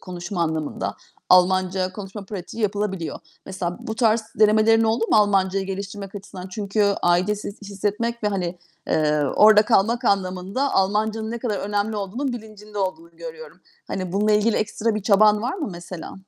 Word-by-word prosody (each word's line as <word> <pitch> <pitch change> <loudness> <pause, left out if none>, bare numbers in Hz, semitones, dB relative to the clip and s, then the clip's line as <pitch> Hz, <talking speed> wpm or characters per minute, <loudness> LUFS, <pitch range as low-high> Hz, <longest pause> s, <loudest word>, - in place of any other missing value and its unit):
konuşma 175 0 -4
anlamında, 160 -2 -2 0.3
Almanca 185 0 +3
konuşma 200 0 -8
pratiği 200 +3 -6
yapılabiliyor. 200 -4 -2 0.3
Mesela 180 -2 -4
bu 220 - -5
tarz 225 -1 +3 0.2
denemelerin 215 +1 +5
oldu 225 +1 +1
mu - - +5
Almancayı 195 -2 +2
geliştirmek 195 +1 -6
açısından? 190 -2 -8
Çünkü 205 +2 -1 0.2
aidiyet 185 +4 +2
his 205 +1 -8
hissetmek 210 +4 -3
ve, 210 - +2
hani, 180 -3 -3 0.3
eee, 150 -1 +2
orada 210 0 +7
kalmak 230 +2 +2
anlamında 195 +6 0
Almancanın 215 +3 +1
ne 235 - -4
kadar 220 -4 -2
önemli 205 +2 -1
olduğunun 230 +7 -3
bilincinde 215 -2 -9
olduğunu 200 - -4
görüyorum. 480 -1 -10 0.3
Hani, 185 -2 -4
bununla 210 +2 +2
ilgili 210 +1 +3
ekstra 215 +1 -1
bir 215 - -3
çaban 210 +1 +4
var 250 - -1
mı 345 - -4
mesela? 175 0 -8
205 Hz, 155 wpm, -23 LUFS, 185-220 Hz, 0.3 s, orada